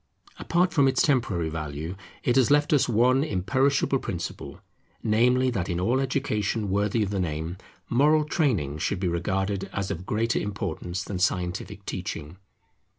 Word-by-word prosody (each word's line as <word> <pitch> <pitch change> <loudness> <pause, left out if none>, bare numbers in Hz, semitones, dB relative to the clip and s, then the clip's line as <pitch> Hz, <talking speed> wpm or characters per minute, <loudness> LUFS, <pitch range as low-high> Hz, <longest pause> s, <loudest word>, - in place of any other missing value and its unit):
Apart 180 +2 +1
from 140 -3 +4
its 130 -1 +3
temporary 105 - +1
value, 75 +2 -5 0.3
it 120 - +2
has 130 -1 +4
left 145 +3 +3
us 140 -3 +3
one 125 +4 +4
imperishable 135 - +1
principle, 85 -7 -5 0.4
namely 125 +4 +3
that 95 -7 -2
in 85 - -1
all 120 +8 +2
education 115 -7 -1
worthy 105 +3 +1
of 100 - -3
the 100 - -1
name, 80 0 -2 0.3
moral 150 +5 +4
training 110 - 0
should 95 +5 -1
be 95 - 0
regarded 95 +3 -1
as 100 -1 -3
of 90 +3 -6
greater 115 +2 +1
importance 90 -3 -4
than 95 -3 -5
scientific 90 +2 -2
teaching. 85 -3 -5
105 Hz, 150 wpm, -26 LUFS, 90-130 Hz, 0.4 s, from